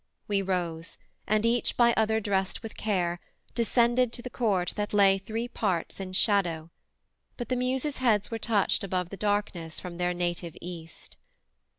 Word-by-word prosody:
We 200 -1 +1
rose, 175 -3 -2 0.3
and 215 +1 +2
each 235 +1 +1
by 235 -1 +6
other 220 0 +2
drest 195 0 -1
with 225 - -7
care 175 -5 0 0.3
Descended 240 +1 +3
to 240 - -5
the 250 - -6
court 195 -7 +1
that 210 0 -2
lay 195 -1 +5
three 225 +4 -3
parts 190 -9 -2
In 190 -1 -5
shadow, 175 -5 +2 0.7
but 240 - -5
the 255 - +1
Muses' 260 +3 -1
heads 220 -5 +2
were 225 - -2
touched 210 -5 +1
Above 185 -2 -1
the - - -5
darkness 195 -5 -1
from 175 -1 -8
their 180 0 +1
native 175 -1 -2
East. 170 -2 -10
200 Hz, 165 wpm, -28 LUFS, 180-230 Hz, 0.7 s, by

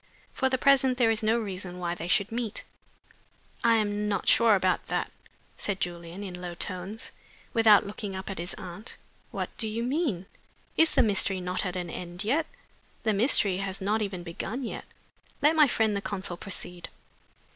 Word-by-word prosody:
For 265 - +1
the 260 - +1
present 265 -1 +4
there 235 -3 +4
is 220 - +1
no 220 +1 +3
reason 185 -4 -5
why 175 -1 -2
they 170 -1 -5
should 200 +3 +2
meet." 230 -2 -3 1.0
"I 230 -1 +5
am 210 -1 0
not 200 -3 -1
sure 230 -2 +6
about 185 -1 +1
that," - - -1 0.5
said 200 -2 -2
Julian, 175 +2 -4
in 180 -2 -7
low 175 -1 -5
tones, 185 +5 -4 0.4
without 220 -3 +6
looking 200 -1 -5
up 190 0 -6
at 195 - -4
his 175 +2 -4
aunt. 190 +2 -9 0.3
"What - - -4
do 220 - +1
you 225 +2 -2
mean? 250 - -1 0.5
Is 320 -1 +4
the 265 - +6
mystery 195 -3 +2
not 180 +2 -1
at 180 - -2
an 175 -2 -3
end 175 +3 -5
yet?" 290 +9 +1 0.6
"The 220 - +2
mystery 200 -3 +4
has 195 0 -3
not 210 +3 0
even 195 -4 -3
begun 195 +9 -4
yet. 230 - -5 0.5
Let 300 +3 +4
my 305 -2 +7
friend 220 -4 +1
the 200 - -1
consul 190 -2 -4
proceed." 180 -2 -5
200 Hz, 180 wpm, -28 LUFS, 180-225 Hz, 1.0 s, my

